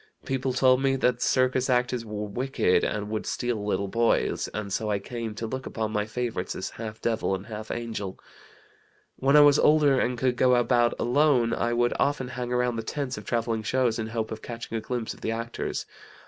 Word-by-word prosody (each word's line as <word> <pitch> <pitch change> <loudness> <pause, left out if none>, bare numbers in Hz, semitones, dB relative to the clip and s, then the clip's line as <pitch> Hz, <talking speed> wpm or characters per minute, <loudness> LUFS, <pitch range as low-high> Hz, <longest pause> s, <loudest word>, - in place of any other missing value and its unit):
People 130 0 -1
told 130 0 +4
me 135 -1 +2
that 125 -2 +1
circus 130 0 +2
actors 125 -1 +1
were 105 -1 -4
wicked, 120 -3 +1
and 105 0 -2
would 110 - -3
steal 120 -4 -2
little 100 -1 -1
boys, 115 +3 +1
and 100 -2 -5
so 110 +1 -1
I 105 - +1
came 115 +1 -5
to 115 - -4
look 130 +3 -5
upon 110 -1 -3
my 105 -1 -1
favorites 115 -5 -3
as 95 - -4
half 110 -1 -7
devil 110 -4 0
and 95 +1 -7
half 110 -1 -7
angel. 110 -5 -4 1.0
When 140 +2 +4
I - - +9
was 145 0 +6
older 150 -3 +5
and 125 0 0
could 125 0 0
go 125 -1 +4
about 120 -1 +3
alone, 125 -2 +3
I 120 0 0
would 120 0 +2
often 140 -3 0
hang 125 -1 -4
around 125 -1 +1
the - - -1
tents 130 +2 -3
of 105 - -9
travelling 115 0 -1
shows 120 0 +1
in 110 - -2
hope 110 -1 -3
of 110 - -6
catching 115 -1 -6
a 110 - -1
glimpse 120 0 -3
of - - -17
the - - -2
actors. 115 +1 -3
120 Hz, 205 wpm, -26 LUFS, 110-125 Hz, 1.0 s, I